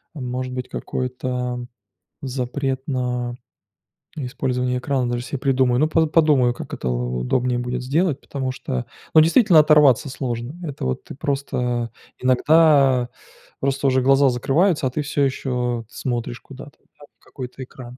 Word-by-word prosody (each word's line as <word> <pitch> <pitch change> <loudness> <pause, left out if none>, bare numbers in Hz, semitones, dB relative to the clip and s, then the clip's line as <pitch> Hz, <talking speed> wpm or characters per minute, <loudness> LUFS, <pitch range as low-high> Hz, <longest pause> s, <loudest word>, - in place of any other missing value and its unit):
может 125 -2 -4
быть, 125 0 -5
какой-то 125 -1 -3 0.5
запрет 130 0 -2
на 125 -2 -2 0.8
использование 125 -2 -1
экрана 130 -2 -1
даже 120 0 -2
себе 140 - -4
придумаю. 130 -2 +2
Ну, 155 - +3
по 160 0 +3
подумаю, 150 -6 +3
как - - -9
это 65 - -4
у 60 0 -2
удобнее 120 - 0
будет 125 +1 -3
сделать, 150 +2 0
потому 135 -2 -4
что, 65 - -4 0.3
ну, - - +8
действительно 170 +1 +5
оторваться 150 -3 +5
сложно. 125 +1 -4
Это 145 - -5
вот 65 - -2
ты - - -9
просто 125 -4 -2 0.3
Иногда 135 -1 +4 0.5
просто 140 0 0
уже 130 0 +3
глаза 135 +1 +5
закрываются, 145 +5 +1
а - - -3
ты 150 - -2
всё 145 0 0
ещё 125 -3 -2
т - - -22
смотришь 120 -1 -3
куда-то, 140 +1 -12 0.2
да, 145 - -13
в - - -32
какой-то 130 0 -8
экран, 125 -1 -11
130 Hz, 150 wpm, -22 LUFS, 125-140 Hz, 0.8 s, ну